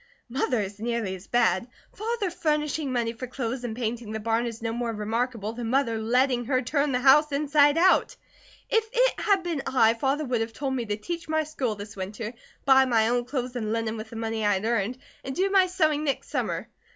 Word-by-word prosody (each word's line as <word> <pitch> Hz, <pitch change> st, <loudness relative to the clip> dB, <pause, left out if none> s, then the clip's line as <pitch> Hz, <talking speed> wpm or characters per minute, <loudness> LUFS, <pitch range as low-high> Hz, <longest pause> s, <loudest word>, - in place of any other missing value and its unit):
"Mother 255 Hz, -1 st, 0 dB
is 200 Hz, 0 st, -4 dB
nearly 230 Hz, -3 st, -2 dB
as 190 Hz, 0 st, -10 dB
bad. 235 Hz, -3 st, +2 dB, 0.3 s
Father 435 Hz, -3 st, -2 dB
furnishing 300 Hz, -3 st, -1 dB
money 235 Hz, -2 st, 0 dB
for 250 Hz, +2 st, -6 dB
clothes 250 Hz, 0 st, -4 dB
and 230 Hz, -3 st, -4 dB
painting 230 Hz, -2 st, -3 dB
the 220 Hz, -, -3 dB
barn 225 Hz, +2 st, 0 dB
is 230 Hz, -1 st, -6 dB
no 225 Hz, 0 st, -3 dB
more 235 Hz, 0 st, -2 dB
remarkable 225 Hz, 0 st, -2 dB
than 235 Hz, -1 st, -4 dB
Mother 235 Hz, -3 st, +1 dB
letting 245 Hz, +2 st, +2 dB
her 255 Hz, +1 st, +2 dB
turn 285 Hz, +3 st, 0 dB
the 250 Hz, -, +1 dB
house 295 Hz, +3 st, +6 dB
inside 290 Hz, +1 st, +3 dB
out. 370 Hz, +3 st, +4 dB, 0.5 s
If 450 Hz, 0 st, +2 dB
it -, -, +2 dB
had 395 Hz, -3 st, +2 dB
been 335 Hz, -5 st, -2 dB
I, 225 Hz, -4 st, +4 dB
Father 275 Hz, +6 st, 0 dB
would 245 Hz, -3 st, 0 dB
have 225 Hz, 0 st, -3 dB
told 270 Hz, +2 st, -2 dB
me 240 Hz, -3 st, -2 dB
to 205 Hz, 0 st, -1 dB
teach 335 Hz, +8 st, -6 dB
my 315 Hz, 0 st, +2 dB
school 265 Hz, -7 st, -2 dB
this 205 Hz, 0 st, -9 dB
winter, 210 Hz, +4 st, -5 dB, 0.3 s
buy 265 Hz, -1 st, +6 dB
my 225 Hz, -3 st, +3 dB
own 240 Hz, 0 st, +1 dB
clothes 255 Hz, -1 st, -3 dB
and 215 Hz, -3 st, -2 dB
linen 225 Hz, -1 st, -1 dB
with 220 Hz, 0 st, -7 dB
the 230 Hz, -, -10 dB
money 225 Hz, -1 st, -2 dB
I 205 Hz, 0 st, +3 dB
had 190 Hz, +3 st, -3 dB
earned, 230 Hz, +1 st, 0 dB, 0.3 s
and 265 Hz, 0 st, -5 dB
do 385 Hz, +2 st, +1 dB
my 380 Hz, -2 st, +5 dB
sewing 310 Hz, -5 st, +1 dB
next 280 Hz, -3 st, -2 dB
summer. -, -, -2 dB
245 Hz, 215 wpm, -26 LUFS, 225-290 Hz, 0.5 s, house